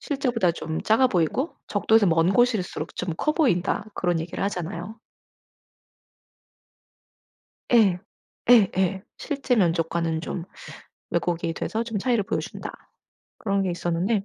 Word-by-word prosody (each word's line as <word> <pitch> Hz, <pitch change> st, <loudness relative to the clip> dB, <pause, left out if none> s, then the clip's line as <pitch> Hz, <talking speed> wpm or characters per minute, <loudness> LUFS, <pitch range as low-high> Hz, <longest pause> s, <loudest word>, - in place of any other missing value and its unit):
실제보다 245 Hz, -, 0 dB
좀 160 Hz, -1 st, -4 dB
작아 225 Hz, +4 st, +4 dB
보이고 200 Hz, -, 0 dB
적도에서 220 Hz, +1 st, +3 dB
먼 165 Hz, +1 st, +3 dB
곳일수록 220 Hz, -10 st, +1 dB
좀 175 Hz, -3 st, -3 dB
커 305 Hz, -, +1 dB
보인다.' 205 Hz, -, +1 dB
그런 175 Hz, -2 st, 0 dB
얘기를 170 Hz, +3 st, -4 dB
하잖아요. 195 Hz, +2 st, -4 dB, 2.7 s
예. 205 Hz, -7 st, +5 dB, 0.5 s
예예. 190 Hz, -4 st, +4 dB, 0.2 s
'실제 275 Hz, -4 st, -1 dB
면적과는 165 Hz, -3 st, +1 dB
좀 170 Hz, 0 st, -5 dB, 0.7 s
왜곡이 170 Hz, -1 st, -1 dB
돼서 225 Hz, +6 st, -2 dB
좀 230 Hz, -3 st, -3 dB
차이를 235 Hz, +1 st, +1 dB
보여 -, -, -1 dB
준다.' -, -, -7 dB, 0.7 s
그런 200 Hz, -2 st, 0 dB
게 185 Hz, -, -1 dB
있었는데 175 Hz, +5 st, -1 dB
190 Hz, 265 characters per minute, -25 LUFS, 170-225 Hz, 2.7 s, 예